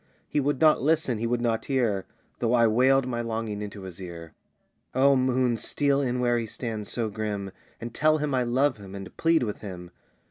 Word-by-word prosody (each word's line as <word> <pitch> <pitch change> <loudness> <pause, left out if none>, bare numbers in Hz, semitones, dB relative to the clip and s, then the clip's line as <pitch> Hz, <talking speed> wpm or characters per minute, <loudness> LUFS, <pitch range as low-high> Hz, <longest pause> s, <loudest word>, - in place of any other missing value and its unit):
"He - - 0
would 145 -1 0
not 155 -5 +5
listen, 145 -5 +1
he 115 - -1
would 120 0 0
not 115 -2 0
hear, 115 -8 0 0.3
Though 115 0 +1
I 115 -1 +5
wailed 130 +4 +4
my 120 -2 -2
longing 110 -2 -3
into 100 -1 -7
his 95 -1 -9
ear. 85 -3 -8 0.6
"O 135 +1 +5
moon, 130 -2 +2
steal 140 +5 +1
in 125 -2 -1
where 120 -1 +2
he 115 - -4
stands 110 -2 -5
so 115 -2 -1
grim, 105 -2 -4 0.3
And 115 0 -6
tell 155 0 +3
him 150 -2 -2
I 130 - +2
love 130 +3 +1
him 100 -2 -10
and 95 -1 -8
plead 165 -3 +3
with 105 -3 -3
him. 90 -4 -8
120 Hz, 205 wpm, -26 LUFS, 105-130 Hz, 0.6 s, not